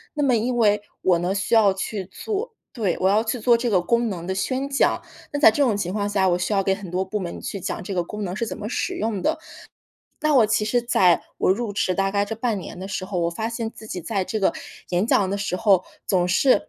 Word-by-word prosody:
那 295 - 0
么 260 -3 +3
因 240 +2 0
为 210 -2 +3 0.2
我 180 -2 +4
呢 175 +2 0
需 200 +3 -2
要 210 -3 +5
去 195 0 -4
做 440 - -4 0.2
对， 205 - -1
我 185 - +2
要 210 +3 +3
去 230 +2 -2
做 240 +2 +4
这 240 +1 -1
个 190 -5 +3
功 235 +5 +1
能 175 -3 -5
的 190 - -2
宣 260 +7 -1
讲， 275 - +2 0.3
那 290 - -2
在 290 - +8
这 250 +7 +1
种 230 -6 +2
情 180 -2 -2
况 205 -1 -1
下， 195 -2 +2
我 175 -1 +2
需 180 - -2
要 200 -1 +3
给 195 0 +1
很 190 -3 -9
多 185 +1 0
部 210 +3 -3
门 175 - -5
去 200 - -5
讲 - - -3
这 195 +2 -5
个 175 - +1
功 210 +4 -6
能 180 0 -4
是 230 - -2
怎 - - -5
么 210 - -5
使 370 - -2
用 220 - -2
的。 315 - 0 0.8
那 305 -1 +2
我 240 -5 +6
其 215 0 +1
实 240 +2 +1
在 185 -7 +3 0.2
我 - - +2
入 210 +2 0
职 185 -2 0
大 195 +1 +1
概 200 0 +1
这 225 - -4
半 225 -1 -1
年 180 - -8
的 190 - -6
时 185 -1 -4
候， 190 -2 -3
我 170 0 +1
发 220 +6 -3
现 230 -1 -3
自 220 - -13
己 180 -4 -5
在 200 -1 -1
这 215 - -3
个 195 - +2 0.4
演 180 +3 +1
讲 195 -5 +2
的 200 - -1
时 200 -2 -2
候， 195 -3 +4 0.2
总 180 -3 +2
是 255 +9 +3
205 Hz, 290 characters per minute, -23 LUFS, 190-230 Hz, 0.8 s, 在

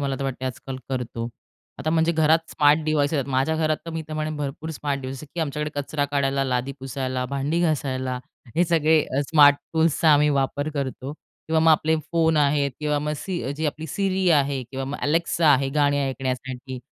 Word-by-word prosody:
मला 140 -1 -1
तर 135 - -3
वाटते 130 -1 -4
आजकाल 130 +1 -5
करतो. 120 -3 -3 0.5
आता 155 +3 -1
म्हणजे 165 +1 +2
घरात 160 0 +4
स्मार्ट 150 +1 +4
डिव्हायसेस 155 -1 +1
आहेत 135 0 -2
माझ्या 135 +5 +1
घरात 155 -1 +1
तर - - -4
मी 165 0 -4
तर 155 - -6
म्हणेन 155 0 -2
भरपूर 150 +2 -4
स्मार्ट 140 -2 -3
डिव्हाइस 130 0 -6
आहेत, 150 - -11
की 170 - -2
आमच्याकडे 150 0 -2
कचरा 145 +1 -2
काढायला 140 -1 0
लादी 130 +1 -1
पुसायला 130 -1 -3
भांडी 140 +5 -1
घासायला 130 -5 -1 0.4
हे 175 - +4
सगळे 160 -2 +3 0.2
अ, - - +3
स्मार्ट 145 -2 +7 0.2
टूल्सचा 160 0 +2
आम्ही 150 0 +4
वापर 140 +1 0
करतो 135 0 -4
किंवा 160 +1 -3
मग 160 - +5
आपले 160 0 +3 0.2
फोन 160 -1 +3
आहेत 145 -1 +2
किंवा 150 -1 0
मग 150 +1 -2
सी 175 -4 -4
जी 160 - -1
आपली 155 +2 -4
सिरी 190 +3 0
आहे 140 -3 +2
किंवा 135 0 -4
मग 140 +2 -4
अलेक्सा 165 +2 +1
आहे 135 0 +2
गाणी 145 -1 +3
ऐकण्यासाठी 130 -1 -3
145 Hz, 195 wpm, -24 LUFS, 135-160 Hz, 0.5 s, स्मार्ट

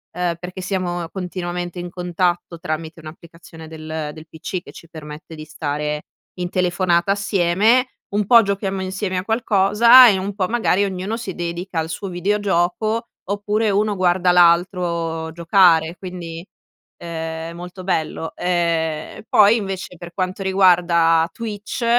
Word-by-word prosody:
ehm, 180 -1 -1
perché 180 +2 -7
siamo 180 -2 -2
continuamente 180 -1 -5
in 175 0 -5
contatto 175 -1 -2
tramite 160 +1 -5
un'applicazione 160 0 -12
del 155 -1 -6
del 160 0 -12
PC 175 +3 -5
che - - -12
ci 165 - -14
permette 155 0 -10
di 155 0 -9
stare 150 -1 -3 0.4
in 180 0 -2
telefonata 180 0 +1
assieme, 200 +5 +2 0.3
un 210 0 +1
po' 235 0 +8
giochiamo 195 -1 -2
insieme 190 0 -3
a 180 - -2
qualcosa 225 +2 +6
e 200 - +2
un 195 +2 -3
po' 190 -3 0
magari 220 -3 +1
ognuno 195 +3 -3
si 200 -6 -6
dedica 175 +1 -5
al 160 0 -3
suo 195 +5 -5
videogioco 205 +4 0 0.2
oppure 205 +2 0
uno 205 +1 +1
guarda 180 -1 +2
l'altro 170 -2 +2
giocare 170 -1 +3
quindi, 170 -3 -7 0.6
ehm, 165 -1 -5 0.2
è - - -9
molto 180 +2 -9
bello. 160 -3 -2
Ehm, 165 -3 -1
e - - -13
poi 210 +1 +6
invece, 190 -4 -5
per 175 +1 -10
quanto 185 +1 -3
riguarda 175 -4 +4
Twitch, 215 +1 -5
180 Hz, 145 wpm, -20 LUFS, 165-195 Hz, 0.6 s, po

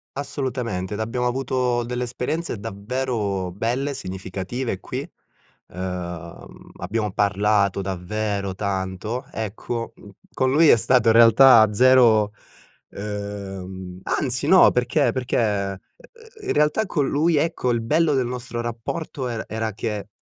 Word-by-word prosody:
Assolutamente, 125 -9 -3
ed - - -6
abbiamo 120 +3 -2
avuto 125 -1 0
delle 125 +1 -3
esperienze 125 +3 -3
davvero 105 -2 -3
belle, 125 +8 -1
significative 95 +2 -5
qui, - - -5 0.6
uhm, 90 -2 -7
abbiamo 105 +2 -2
parlato 100 0 +2
davvero 100 +1 -3
tanto. 100 +5 -3
Ecco, 115 +1 -4
mhmm, - - -15 0.2
con 130 0 +1
lui 155 +4 +5
è - - +8
stato 115 +1 +2
in 115 - +6
realtà 115 -1 +7
zero 115 -3 +5 0.6
uhm, 95 -3 -6
anzi 130 0 -1
no, 185 +3 +7
perché 125 +4 +1
perché, 130 -2 -1
uhm, 100 -3 0 0.7
uhm, 410 - -9
in - - +2
realtà 150 +9 +2
con 150 -8 0
lui, 155 +3 +2
ecco, 155 -4 0
il 120 - +1
bello 155 +6 +2
del 130 -2 +1
nostro 120 -1 -5
rapporto 120 +4 -4
er 115 -2 -4
era 110 +1 -3
che 105 -1 -4
115 Hz, 130 wpm, -23 LUFS, 100-130 Hz, 0.7 s, è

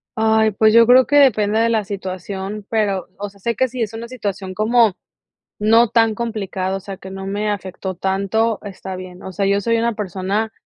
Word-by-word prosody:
Ay, 220 -1 +3
pues 215 +2 +3
yo 230 0 +7
creo 255 +1 +7
que 290 - +2
depende 220 -6 +4
de 230 +1 +3
la 220 -2 +1
situación, 195 +1 -6
pero, 205 -4 0
o 205 0 -4
sea, 200 - -21
sé 235 +3 -2
que 260 +3 +2
sí 250 0 -6
es 220 0 -2
una 230 +1 -6
situación 200 -6 -5
como 220 -1 +3 0.6
no 225 +2 +4
tan 225 -1 +3
complicada, 195 -5 -3
o - - -6
sea, 195 0 -8
que 190 - -11
no 195 0 -7
me 205 +2 -1
afectó 190 -1 -5
tanto, 200 +4 0
está 190 -2 -7
bien. 185 0 -9
O 190 - -7
sea, 200 +1 -1
yo 200 +1 +2
soy 230 +3 +1
una 235 0 0
persona 205 +2 -2
210 Hz, 210 wpm, -19 LUFS, 195-225 Hz, 0.6 s, yo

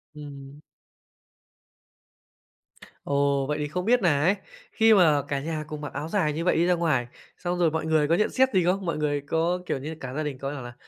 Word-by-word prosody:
Ừm. 140 -1 -10 2.5
Ồ, 140 -1 +1
vậy 150 0 -1
thì 150 - -2
không 180 +5 -4
biết 245 0 +3
nà 145 -6 +2
ấy, 190 +5 +3 0.4
khi 225 -1 +5
mà 155 -7 +5
cả 140 -1 -1
nhà 155 +1 -4
cùng 150 -1 -7
mặc 145 - -6
áo 155 +2 -4
dài 160 -7 +1
như 165 +3 -3
vậy - - +3
đi 170 - +3
ra 180 - +3
ngoài, 155 -8 0 0.3
xong 180 0 -3
rồi 165 -3 +3
mọi 160 0 -2
người 155 -2 +2
có 165 - +3
nhận 210 - +1
xét 260 0 +3
gì 185 -2 +3
không? 190 +1 0
Mọi 165 -3 -1
người 145 -1 -1
có, 165 +5 0
kiểu - - -1
như, 155 +4 -6
cả 130 -2 -7
gia 155 +2 -2
đình 145 -3 -4
có 135 +1 -4
bảo 140 - -6
là 120 0 -9
155 Hz, 225 wpm, -26 LUFS, 145-175 Hz, 2.5 s, khi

